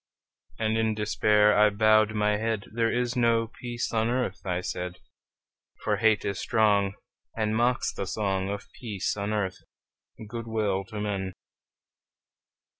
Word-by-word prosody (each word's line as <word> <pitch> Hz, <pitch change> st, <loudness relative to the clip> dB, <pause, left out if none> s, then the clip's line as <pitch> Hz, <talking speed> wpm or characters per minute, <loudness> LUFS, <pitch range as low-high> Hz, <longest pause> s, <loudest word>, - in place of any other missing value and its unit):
And 110 Hz, 0 st, 0 dB
in 110 Hz, -1 st, +1 dB
despair 105 Hz, 0 st, +3 dB
I 105 Hz, 0 st, +6 dB
bowed 110 Hz, +1 st, +4 dB
my 105 Hz, 0 st, +2 dB
head; 110 Hz, -1 st, -1 dB
"There 115 Hz, 0 st, +1 dB
is 125 Hz, 0 st, 0 dB
no 115 Hz, -2 st, +3 dB
peace 120 Hz, -1 st, -3 dB
on 115 Hz, 0 st, +1 dB
earth," 120 Hz, -6 st, -1 dB
I 90 Hz, 0 st, 0 dB
said: 90 Hz, -1 st, -4 dB, 0.9 s
"For -, -, +1 dB
hate 110 Hz, -2 st, +3 dB
is 100 Hz, -1 st, -2 dB
strong, 100 Hz, -3 st, +2 dB, 0.4 s
And 110 Hz, -1 st, 0 dB
mocks 120 Hz, +2 st, +1 dB
the 95 Hz, -, -4 dB
song 95 Hz, -1 st, -1 dB
Of 100 Hz, 0 st, -4 dB
peace 105 Hz, -6 st, -2 dB
on 100 Hz, 0 st, -3 dB
earth, 95 Hz, -3 st, -1 dB, 0.7 s
good 115 Hz, +1 st, -6 dB
will 105 Hz, -4 st, 0 dB
to 110 Hz, 0 st, -7 dB
men!" 100 Hz, -2 st, -2 dB
105 Hz, 145 wpm, -27 LUFS, 100-115 Hz, 0.9 s, I